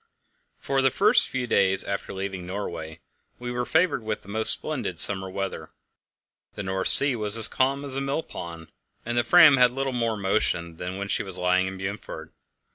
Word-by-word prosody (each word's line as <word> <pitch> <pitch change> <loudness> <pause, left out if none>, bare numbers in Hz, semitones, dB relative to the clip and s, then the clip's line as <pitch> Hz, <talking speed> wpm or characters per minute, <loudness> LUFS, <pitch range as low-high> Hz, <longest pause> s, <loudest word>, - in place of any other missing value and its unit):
For 135 -1 -1
the 135 - +3
first - - +3
few 130 -1 -3
days 95 -4 +2
after 100 - -5
leaving 95 -1 -6
Norway 85 -4 -7 0.4
we 120 0 -6
were 125 0 -3
favoured 160 -4 +1
with 110 -1 -5
the 100 - -15
most 110 +2 +3
splendid 130 - -4
summer 95 +3 +5
weather. 95 0 -6 0.9
The 100 - -6
North 95 0 -2
Sea 140 -2 +4
was 105 -1 +4
as 115 -1 +5
calm 135 +2 -1
as 135 -2 -3
a 135 - -2
millpond; 85 - -6 0.3
the 120 +1 0
Fram 150 +1 +6
had 125 -1 +5
little 135 +1 -4
more 115 -3 -2
motion 90 -4 -2
than 90 +2 -6
when 100 0 -5
she - - -1
was 95 -2 -1
lying 90 +1 +1
in 95 0 -7
Bundefjord. 95 +2 -7
105 Hz, 185 wpm, -24 LUFS, 95-130 Hz, 0.9 s, Fram